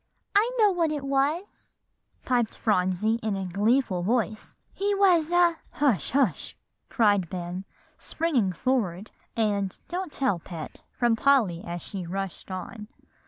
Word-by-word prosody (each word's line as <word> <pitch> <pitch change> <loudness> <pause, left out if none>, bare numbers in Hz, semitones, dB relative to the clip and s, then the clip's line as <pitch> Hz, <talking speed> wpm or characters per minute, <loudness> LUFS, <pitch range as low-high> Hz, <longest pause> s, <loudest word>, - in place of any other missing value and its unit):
"I 425 +4 +5
know 425 -3 +5
what 335 -4 +1
it 295 -2 -3
was," 280 +7 -2 0.5
piped 240 -3 0
Phronsie 205 +2 +1
in 215 -2 -1
a 195 -1 -3
gleeful 205 +1 +1
voice; 220 +2 -1 0.2
"he 405 +1 0
was 355 -5 +4
a" 350 -1 +4 0.2
"Hush 245 - +1
hush!" 275 0 0 0.3
cried 205 -7 +2
Ben, 180 +1 -5 0.3
springing 275 - 0
forward, 205 -3 -1 0.2
and 205 -4 0
"Don't 360 -1 -3
tell, 260 -12 0
Pet," 165 -2 -9
from 240 -2 +2
Polly 225 -10 +2
as 175 0 -6
she 185 -4 -6
rushed 195 +1 -5
on. 210 +3 -6
225 Hz, 135 wpm, -26 LUFS, 190-290 Hz, 0.5 s, I